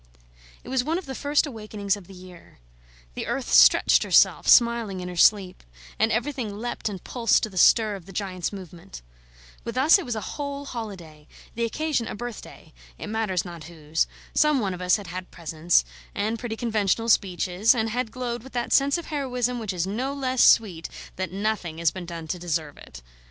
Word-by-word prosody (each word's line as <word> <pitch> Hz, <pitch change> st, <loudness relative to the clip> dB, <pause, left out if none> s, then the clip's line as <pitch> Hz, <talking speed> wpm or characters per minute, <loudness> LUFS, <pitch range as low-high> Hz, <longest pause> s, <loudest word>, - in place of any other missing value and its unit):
It -, -, -11 dB
was 260 Hz, -1 st, +1 dB
one 320 Hz, +5 st, -1 dB
of 370 Hz, -, -6 dB
the 270 Hz, -, -6 dB
first 285 Hz, +3 st, +1 dB
awakenings 215 Hz, -6 st, -3 dB
of 200 Hz, -4 st, -13 dB
the 195 Hz, -, -13 dB
year. 180 Hz, -1 st, -14 dB, 0.6 s
The -, -, -5 dB
earth -, -, -3 dB
stretched -, -, +6 dB
herself, -, -, +3 dB
smiling 235 Hz, -5 st, +4 dB
in 180 Hz, 0 st, -5 dB
her 180 Hz, -, -7 dB
sleep; 190 Hz, +1 st, +3 dB, 0.4 s
and 220 Hz, +1 st, +3 dB
everything 235 Hz, -3 st, -2 dB
leapt 235 Hz, 0 st, -4 dB
and 190 Hz, -4 st, -8 dB
pulsed 235 Hz, -3 st, +1 dB
to 215 Hz, -, -2 dB
the -, -, -14 dB
stir 220 Hz, +1 st, +5 dB
of 190 Hz, -2 st, -11 dB
the -, -, -10 dB
giant's 185 Hz, -2 st, -3 dB
movement. 175 Hz, -, -10 dB, 0.6 s
With 235 Hz, +2 st, -6 dB
us 305 Hz, +9 st, +6 dB
it 370 Hz, -, -6 dB
was 245 Hz, -, -3 dB
a -, -, -2 dB
whole 280 Hz, +5 st, -5 dB
holiday; 180 Hz, -, -8 dB, 0.3 s
the 235 Hz, +1 st, -1 dB
occasion 280 Hz, 0 st, -1 dB
a -, -, -5 dB
birthday 240 Hz, 0 st, -9 dB, 0.2 s
it -, -, -7 dB
matters 215 Hz, -5 st, -1 dB
not 170 Hz, -3 st, -9 dB
whose. 160 Hz, -1 st, -2 dB, 0.3 s
Some 300 Hz, -2 st, +3 dB
one 195 Hz, -5 st, -1 dB
of 180 Hz, -, -8 dB
us 180 Hz, 0 st, +3 dB
had 205 Hz, -, -6 dB
had 180 Hz, +1 st, -7 dB
presents, 165 Hz, -, +1 dB, 0.3 s
and 220 Hz, +2 st, -1 dB
pretty 225 Hz, -2 st, -5 dB
conventional 225 Hz, -1 st, 0 dB
speeches, 195 Hz, +1 st, +2 dB
and 225 Hz, -1 st, 0 dB
had 245 Hz, 0 st, -2 dB
glowed 245 Hz, -2 st, -4 dB
with 265 Hz, +3 st, -14 dB
that 240 Hz, -1 st, -1 dB
sense 280 Hz, +3 st, +4 dB
of 340 Hz, -, -7 dB
heroism 250 Hz, -4 st, -2 dB
which 215 Hz, -3 st, -3 dB
is 180 Hz, -2 st, -2 dB
no 250 Hz, +8 st, -3 dB
less 260 Hz, -2 st, +1 dB
sweet 180 Hz, -8 st, +4 dB, 0.3 s
that 185 Hz, 0 st, -3 dB
nothing 195 Hz, -4 st, -2 dB
has 165 Hz, -2 st, +2 dB
been 185 Hz, -2 st, -8 dB
done 165 Hz, -2 st, -7 dB
to 180 Hz, -, -3 dB
deserve 160 Hz, -4 st, -3 dB
it. -, -, -13 dB
210 Hz, 200 wpm, -25 LUFS, 180-245 Hz, 0.6 s, stretched